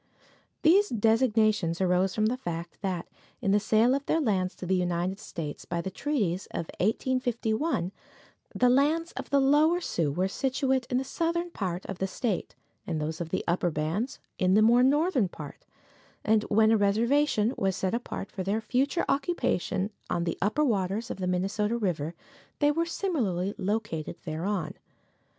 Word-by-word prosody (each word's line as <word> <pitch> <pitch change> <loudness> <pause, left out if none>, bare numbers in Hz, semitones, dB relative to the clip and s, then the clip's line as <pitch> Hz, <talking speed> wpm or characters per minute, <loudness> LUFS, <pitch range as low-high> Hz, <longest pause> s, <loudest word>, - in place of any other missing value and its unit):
These 390 +6 +5
designations 215 -6 +2
arose 185 0 +2
from 215 - +2
the 230 +3 +1
fact 170 -7 -6
that, 185 -4 -2 0.3
in 200 -6 0
the 205 - +4
sale 220 +4 +3
of 280 +1 0
their 325 - +2
lands 195 - 0
to - - -7
the 190 - 0
United 180 +1 0
States 150 -3 -6
by 170 - -3
the 190 +3 -4
treaties 195 - -1
of 170 - -4
1851, 230 - 0 0.6
the 250 - +4
lands 300 +7 +3
of - - -7
the 280 - +4
Lower 300 +5 +4
Sioux 165 - -1
were 180 +6 0
situate 265 +3 0
in 250 - +1
the 260 - 0
southern 340 +5 -1
part 185 - -3
of 195 - -6
the 190 - 0
state, 205 0 -3 0.3
and 160 -3 -1
those 155 +2 -3
of 165 - -4
the - - -1
upper 175 +1 +1
bands 165 - -2 0.2
in 185 0 +3
the 215 - +6
more 235 +2 +6
northern 280 - +3
part, - - -10 0.6
and 215 0 +3
when 220 +1 +4
a 225 - +5
reservation 230 +3 +2
was 190 -2 0
set 190 0 -1
apart 235 -4 -4
for 195 - -5
their 200 +4 0
future 260 +9 0
occupation 215 - 0 0.2
on 170 - 0
the 170 -1 -1
upper 220 +11 +2
waters 210 0 -1
of - - -5
the 185 -1 -2
Minnesota 195 +5 0
river 170 -7 -2 0.4
they 290 0 +3
were 335 +3 0
similarly 215 - -1
located 205 -5 -2
thereon. 175 +4 -2
210 Hz, 170 wpm, -28 LUFS, 180-260 Hz, 0.6 s, the